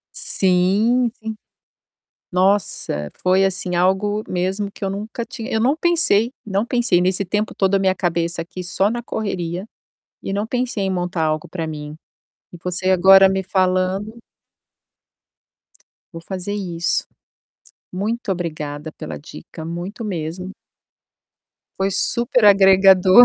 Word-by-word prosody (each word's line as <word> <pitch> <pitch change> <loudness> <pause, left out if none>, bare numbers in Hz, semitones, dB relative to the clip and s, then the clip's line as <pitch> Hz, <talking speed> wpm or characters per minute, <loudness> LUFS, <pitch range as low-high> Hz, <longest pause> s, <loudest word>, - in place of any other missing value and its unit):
Sim, 200 +7 +2
sim. 220 -2 -6 1.0
Nossa, 185 - +1
foi, 185 +1 +3
assim, 185 -1 0
algo 205 +4 +1
mesmo 190 +3 -2
que - - -18
eu 195 - 0
nunca 210 +4 -5
tinha 230 -1 -7
eu 220 - +1
não 270 +6 +2
pensei, 320 -10 +3
não 200 +2 0
pensei. 240 -7 +2
Nesse 185 +1 +1
tempo 210 +3 -2
todo 195 0 +1
a - - +4
minha 190 -1 +2
cabeça 170 -2 -1
aqui 180 +2 -7
só 195 +3 +1
na 240 0 -3
correria, 185 -4 -4 0.6
e 195 - -4
não 205 +2 -1
pensei 245 -4 -2
em 190 - -1
montar 180 -2 -1
algo 155 0 -1
para 165 -3 -5
mim. 150 -1 -7 0.6
E - - -9
você 180 +1 -1
agora 190 +1 +7
me 190 0 -1
falando 185 +4 0 2.0
Vou 165 - -8
fazer 190 +3 -5
isso. 175 -4 -2 0.9
Muito 205 +3 -2
obrigada 155 -3 -5
pela 75 - -7
dica, 75 - -11
muito 175 +7 -6
mesmo. 180 0 -4 1.3
Foi 195 +1 +1
super 235 +3 +1
agregador. 195 +1 +7
190 Hz, 130 wpm, -20 LUFS, 175-210 Hz, 2.0 s, agora